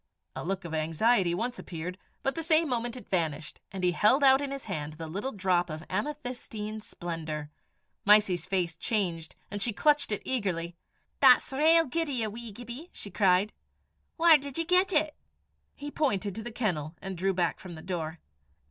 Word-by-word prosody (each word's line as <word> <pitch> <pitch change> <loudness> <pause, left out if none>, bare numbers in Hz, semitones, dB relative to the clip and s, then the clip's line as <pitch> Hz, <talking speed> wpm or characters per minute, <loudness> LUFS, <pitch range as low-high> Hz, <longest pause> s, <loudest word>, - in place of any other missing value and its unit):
A - - -4
look 190 +1 -3
of 165 - -6
anxiety 170 +4 +2
once 235 +5 -3
appeared, 180 +2 -6 0.2
but 270 - +1
the 330 - -4
same 320 0 +3
moment 240 -1 -2
it 240 - -11
vanished, 160 -4 -2
and 190 -1 -5
he 180 - +4
held 230 +10 +4
out 265 0 +7
in 285 - -2
his 275 0 -5
hand 155 -7 -4
the 160 +1 -7
little 200 +12 -4
drop 185 -4 +1
of 155 +1 -6
amethystine 245 -7 -4
splendour. 160 -6 -5 0.5
Mysie's 200 -5 +4
face 180 -4 0
changed, 170 -4 -1 0.2
and 205 - -3
she 230 +2 +1
clutched 295 +2 +3
it 210 - -2
eagerly. 180 -9 -1 0.4
"That's 265 0 +6
rale 325 +4 +5
guid 325 +4 -2
o' - - -2
ye, 235 -3 0
wee 225 +1 -6
Gibbie!" 245 - -9
she 200 - -8
cried. 190 +2 +3 0.6
"Whaur 330 -1 +7
did 280 -1 -7
ye 330 - 0
get 365 +2 +3
it?" 310 -2 +2 0.6
He 290 +1 -7
pointed 205 -11 0
to 225 - -5
the 240 +2 -6
kennel, 170 -9 -2
and 195 0 -6
drew 190 +3 +1
back 175 -1 0
from 180 -2 -9
the 160 - -10
door. 170 -3 -4
205 Hz, 185 wpm, -29 LUFS, 175-265 Hz, 0.6 s, out